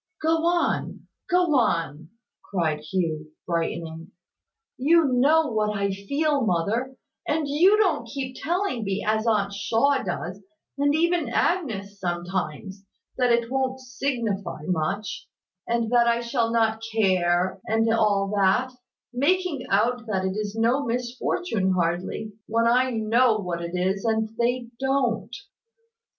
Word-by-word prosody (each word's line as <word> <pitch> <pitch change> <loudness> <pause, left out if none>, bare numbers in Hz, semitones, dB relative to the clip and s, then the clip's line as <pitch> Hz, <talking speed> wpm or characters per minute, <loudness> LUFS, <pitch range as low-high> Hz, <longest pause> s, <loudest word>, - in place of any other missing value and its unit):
"Go 325 +1 +1
on! 345 0 0 0.3
Go 360 -3 +3
on!" 165 -7 -1 0.4
cried 160 -5 0
Hugh, 155 -1 -3
brightening. 165 -1 -3 0.7
"You 325 +5 +4
know 280 +3 +3
what 210 -1 0
I 200 0 0
feel, 280 +9 0
mother; 220 +8 0 0.3
and 300 0 0
you 350 +9 +4
don't 345 - +1
keep 260 +1 -5
telling 345 - -1
me, 195 0 -2
as 220 +1 +1
Aunt 200 -3 +1
Shaw 235 +7 +1
does 180 -1 -5 0.3
(and 285 +1 +2
even 340 -4 +1
Agnes 220 - -1
sometimes), 180 +1 -4 0.3
that 250 -1 +3
it 235 0 +1
wont 265 -1 -1
signify 245 - -3
much, 185 +4 -2 0.4
and 235 -1 0
that 240 -1 +4
I 235 0 +2
shall 235 -1 0
not 225 -1 +1
care, 185 -2 +2
and 225 +1 +2
all 205 -3 +2
that; 205 +6 +2 0.4
making 305 +1 0
out 230 +4 +1
that 190 -3 -1
it 190 0 -2
is 210 0 -3
no 235 +5 +2
misfortune 240 - -1
hardly, 180 +4 -2
when 230 +1 +1
I 250 +2 +3
know 225 0 +2
what 180 -4 -4
it 170 +1 -5
is, 190 +2 0
and 220 -1 0
they 240 0 0
don't." 265 -4 0
225 Hz, 135 wpm, -25 LUFS, 195-260 Hz, 0.7 s, You